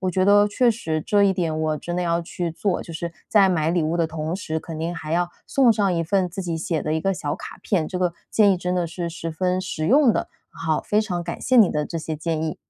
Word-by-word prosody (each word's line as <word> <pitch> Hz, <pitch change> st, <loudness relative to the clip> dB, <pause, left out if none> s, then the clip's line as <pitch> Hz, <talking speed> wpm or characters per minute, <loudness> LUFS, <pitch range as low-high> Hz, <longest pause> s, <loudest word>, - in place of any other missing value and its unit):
我 185 Hz, -1 st, 0 dB
觉 185 Hz, +1 st, +1 dB
得 205 Hz, +1 st, +6 dB
确 235 Hz, +4 st, +3 dB
实 160 Hz, -8 st, -2 dB
这 205 Hz, +6 st, +2 dB
一 195 Hz, -1 st, +4 dB
点 165 Hz, -4 st, -1 dB
我 155 Hz, -1 st, 0 dB
真 175 Hz, +4 st, -4 dB
的 180 Hz, -, 0 dB
要 170 Hz, 0 st, +1 dB
去 170 Hz, 0 st, -4 dB
做， 180 Hz, +3 st, -1 dB
就 165 Hz, -, -10 dB
是 170 Hz, +1 st, -5 dB
在 200 Hz, -3 st, +5 dB
买 160 Hz, -3 st, +1 dB
礼 175 Hz, -2 st, +1 dB
物 160 Hz, +2 st, 0 dB
的 165 Hz, -1 st, +2 dB
同 160 Hz, +2 st, -3 dB
时， 160 Hz, -5 st, -3 dB
肯 165 Hz, -2 st, -7 dB
定 165 Hz, +2 st, -2 dB
还 160 Hz, -1 st, -6 dB
要 175 Hz, +1 st, +1 dB, 0.2 s
送 255 Hz, -4 st, +4 dB
上 200 Hz, -4 st, +1 dB
一 165 Hz, -, 0 dB
份 185 Hz, +1 st, +1 dB
自 185 Hz, +3 st, -6 dB
己 170 Hz, -2 st, -2 dB
写 160 Hz, -1 st, -2 dB
的 155 Hz, +1 st, -1 dB
一 160 Hz, -, 0 dB
个 195 Hz, +4 st, +1 dB
小 145 Hz, -5 st, -3 dB
卡 -, -, -9 dB
片， 170 Hz, -6 st, 0 dB
这 185 Hz, -, -3 dB
个 180 Hz, -2 st, +1 dB, 0.2 s
建 205 Hz, -2 st, +5 dB
议 185 Hz, -, +1 dB
真 180 Hz, +1 st, -2 dB
的 175 Hz, -2 st, 0 dB
是 170 Hz, +1 st, -4 dB
十 165 Hz, 0 st, -5 dB
分 180 Hz, +3 st, 0 dB
实 160 Hz, -4 st, -3 dB
用 265 Hz, -1 st, +5 dB
的。 -, -, -2 dB, 0.2 s
好， 160 Hz, -2 st, -1 dB
非 210 Hz, -, +1 dB
常 180 Hz, -5 st, -2 dB
感 170 Hz, -, -6 dB
谢 255 Hz, -, +2 dB
你 215 Hz, -6 st, +7 dB
的 150 Hz, 0 st, -1 dB
这 165 Hz, -, -4 dB
些 160 Hz, 0 st, -4 dB
建 160 Hz, 0 st, -2 dB
议。 155 Hz, -, -2 dB
175 Hz, 300 characters per minute, -23 LUFS, 160-195 Hz, 0.2 s, 你